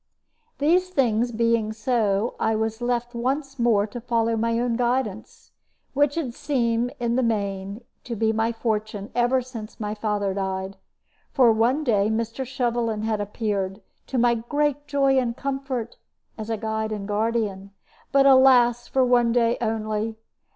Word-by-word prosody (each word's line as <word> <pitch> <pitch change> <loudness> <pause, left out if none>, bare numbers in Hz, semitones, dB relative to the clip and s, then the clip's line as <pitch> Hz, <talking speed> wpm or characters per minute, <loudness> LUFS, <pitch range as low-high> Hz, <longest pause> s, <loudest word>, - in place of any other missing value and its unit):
These 355 +6 +2
things 240 -8 +1
being 230 -1 +1
so, 220 -2 0
I 220 0 +1
was 220 +1 -2
left 240 0 -1
once 270 +3 -2
more 225 -4 +3
to 225 +3 -8
follow 230 -1 0
my 230 +1 0
own 240 0 0
guidance, 245 - -2 0.4
which 285 0 +2
had 290 -8 -2
seemed, 240 -3 0
in 235 0 0
the - - +3
main, 200 -2 -2 0.2
to 240 - -4
be 220 +1 +1
my 225 +1 +1
fortune 215 -3 -3
ever 245 +1 +2
since 230 -4 -9
my 210 -1 -3
father 210 -2 -1
died. 190 0 -3 0.6
For 250 -4 +5
one 240 +7 +2
day 210 -6 +2
Mr. 230 +3 -2
Shovelin 235 -4 -1
had 220 -1 -1
appeared, 205 -2 -2 0.3
to 265 - -3
my 240 0 +4
great 290 +5 -1
joy 275 -2 +3
and 240 -2 -2
comfort, 270 -4 -4 0.4
as 215 0 -7
a 225 - -1
guide 220 0 -2
and 205 -2 -4
guardian; 210 -2 -1 0.4
but, 275 0 +4
alas! 250 -3 +5
for 260 -1 +2
one 240 -1 +3
day 235 0 +2
only. 220 -1 -2
230 Hz, 155 wpm, -24 LUFS, 215-250 Hz, 0.6 s, For